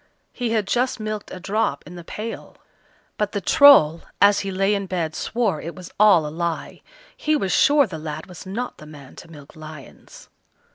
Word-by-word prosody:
He 245 -2 -3
had 220 -2 0
just 245 +4 0
milked 215 -1 -5
a 185 - -8
drop 195 -6 -1
in 170 - -11
the 175 -1 -9
pail. 220 +6 -8 0.6
But - - -1
the - - -1
Troll, 280 - +6 0.2
as 200 0 +5
he 195 - -4
lay 195 +2 +1
in 200 -1 -2
bed, 170 -4 -3
swore 215 -8 -2
it 170 - -7
was 180 -2 -11
all 200 -7 +5
a 150 - -6
lie. 170 -1 -4 0.3
He 310 0 0
was 195 -10 -1
sure 285 -1 +4
the 165 -8 -8
lad 155 0 -6
was 180 -2 -11
not 220 +6 -5
the 155 - -12
man 145 -3 -13
to - - -11
milk 150 -3 -14
lions. 155 -3 -13
185 Hz, 195 wpm, -22 LUFS, 160-215 Hz, 0.6 s, Troll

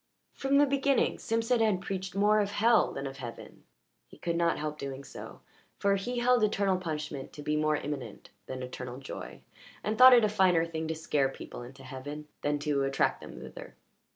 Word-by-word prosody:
From 275 +1 +1
the 290 - +6
beginning 275 -1 +1
Simpson 230 +2 +1
had 215 -5 +3
preached 190 0 -5
more 210 +2 +4
of 205 -1 0
hell 230 +3 +4
than 135 - -5
of 135 0 -6
heaven; 120 -3 -9 0.4
he - - -16
could 170 -1 -2
not 170 0 +2
help 150 0 -4
doing 140 0 -5
so, - - -10 0.4
for 200 0 +2
he 245 +6 -3
held 245 -1 +3
eternal 200 -2 +2
punishment 155 -5 -5
to 150 - -9
be 150 +1 0
more 155 0 +2
imminent 145 -2 -6 0.2
than 130 -1 -5
eternal 125 0 -6
joy, 135 - -8 0.4
and 215 +1 -2
thought 255 0 +11
it 235 -3 +5
a - - +3
finer 185 -5 +3
thing 160 -1 -4
to 160 - -2
scare 145 -3 +1
people 135 - -9
into 135 +2 -11
heaven 145 +3 -7
than 145 0 0
to 145 -1 0
attract 135 0 +1
them - - -10
thither. - - -10
165 Hz, 195 wpm, -30 LUFS, 140-215 Hz, 0.4 s, thought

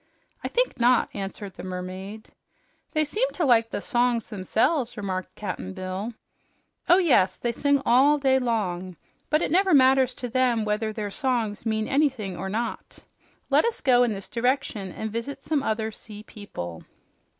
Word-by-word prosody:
"I - - -1
think - - 0
not," 245 +1 +4
answered 195 0 -6
the - - -10
mermaid. 185 +3 -7 0.6
"They 310 -1 +2
seem 445 +11 0
to 345 - 0
like 230 -3 +4
the - - -4
songs 240 0 +1
themselves," 230 - 0
remarked 190 -2 -4
Cap'n 190 -1 -5
Bill. 190 +4 -5 0.7
"Oh 355 - +8
yes, 275 - +3
they 240 - -1
sing 280 +3 +1
all 275 +5 +5
day 265 -2 +3
long. 185 -7 -2 0.3
But 305 +2 +2
it - - -1
never 375 -1 +4
matters 260 -1 +4
to 250 - -5
them 245 -2 +1
whether 215 +1 -1
their 210 -2 -4
songs 235 -5 -1
mean 220 0 0
anything 265 -10 0
or 190 +2 -4
not. 230 +4 -4 0.5
Let - - +5
us 465 -1 0
go 250 -2 +4
in 245 -2 +3
this 195 -2 -5
direction 235 -5 -1
and 220 +3 -5
visit 230 +5 -5
some 300 -2 0
other 220 -3 -1
sea 210 -1 -9
people." 85 - -8
230 Hz, 165 wpm, -25 LUFS, 200-265 Hz, 0.7 s, Oh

